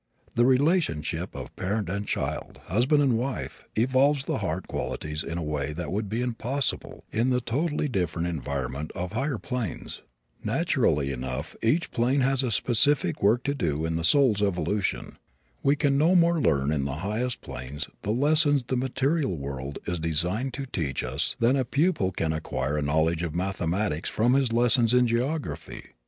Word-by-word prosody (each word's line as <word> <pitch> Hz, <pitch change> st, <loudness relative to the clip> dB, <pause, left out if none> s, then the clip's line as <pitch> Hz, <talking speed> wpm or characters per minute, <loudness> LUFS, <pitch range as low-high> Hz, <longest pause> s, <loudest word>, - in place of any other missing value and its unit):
The 120 Hz, +1 st, +3 dB
relationship 130 Hz, -, +1 dB
of -, -, -8 dB
parent 100 Hz, +1 st, -2 dB
and 100 Hz, +3 st, -3 dB
child, -, -, -3 dB
husband 130 Hz, -, +3 dB
and 125 Hz, -5 st, +2 dB
wife, 80 Hz, -, -4 dB
evolves 130 Hz, +4 st, +3 dB
the -, -, -1 dB
heart 95 Hz, -2 st, -3 dB
qualities 75 Hz, 0 st, -3 dB
in 85 Hz, -, -4 dB
a 85 Hz, -, -2 dB
way 75 Hz, -1 st, -2 dB
that 80 Hz, -1 st, -5 dB
would 105 Hz, +1 st, -2 dB
be 115 Hz, +3 st, -1 dB
impossible 125 Hz, +3 st, -2 dB
in 115 Hz, +4 st, +1 dB
the 125 Hz, -1 st, +2 dB
totally 145 Hz, +6 st, -1 dB
different 85 Hz, -, -1 dB
environment 70 Hz, -2 st, -3 dB
of 90 Hz, 0 st, -3 dB
higher 135 Hz, +2 st, -1 dB
planes. 120 Hz, -4 st, -5 dB, 0.4 s
Naturally 70 Hz, -2 st, +1 dB
enough, 65 Hz, +4 st, -4 dB
each 155 Hz, +10 st, +1 dB
plane 130 Hz, +4 st, +2 dB
has 135 Hz, 0 st, +2 dB
a 130 Hz, -, -1 dB
specific 120 Hz, -, +2 dB
work 110 Hz, +5 st, +3 dB
to 140 Hz, -, 0 dB
do 80 Hz, -, -1 dB
in 80 Hz, 0 st, -1 dB
the 85 Hz, -, -2 dB
soul's 115 Hz, -, +4 dB
evolution. 100 Hz, 0 st, -1 dB, 0.4 s
We 140 Hz, +1 st, +3 dB
can 140 Hz, -2 st, +2 dB
no 165 Hz, +5 st, +4 dB
more 170 Hz, -2 st, +4 dB
learn 70 Hz, -, +2 dB
in 70 Hz, -3 st, 0 dB
the 70 Hz, -1 st, -2 dB
highest 115 Hz, +4 st, -2 dB
planes 70 Hz, +3 st, -6 dB
the -, -, -5 dB
lessons 145 Hz, +3 st, +4 dB
the 125 Hz, +1 st, -2 dB
material 130 Hz, -, 0 dB
world 70 Hz, 0 st, -5 dB
is 90 Hz, -1 st, -2 dB
designed 90 Hz, -, 0 dB
to 135 Hz, 0 st, -4 dB
teach 80 Hz, -, -2 dB
us 65 Hz, +3 st, -1 dB
than 120 Hz, +3 st, +4 dB
a 135 Hz, -, +2 dB
pupil 140 Hz, -, +1 dB
can 80 Hz, -3 st, -1 dB
acquire 70 Hz, -3 st, -2 dB
a -, -, -1 dB
knowledge 80 Hz, +3 st, +1 dB
of 85 Hz, -2 st, -3 dB
mathematics 90 Hz, -2 st, -1 dB
from 120 Hz, +3 st, +2 dB
his 135 Hz, -3 st, +2 dB
lessons 120 Hz, 0 st, +4 dB
in 125 Hz, 0 st, +5 dB
geography. 130 Hz, +7 st, -3 dB
110 Hz, 175 wpm, -26 LUFS, 80-130 Hz, 0.4 s, in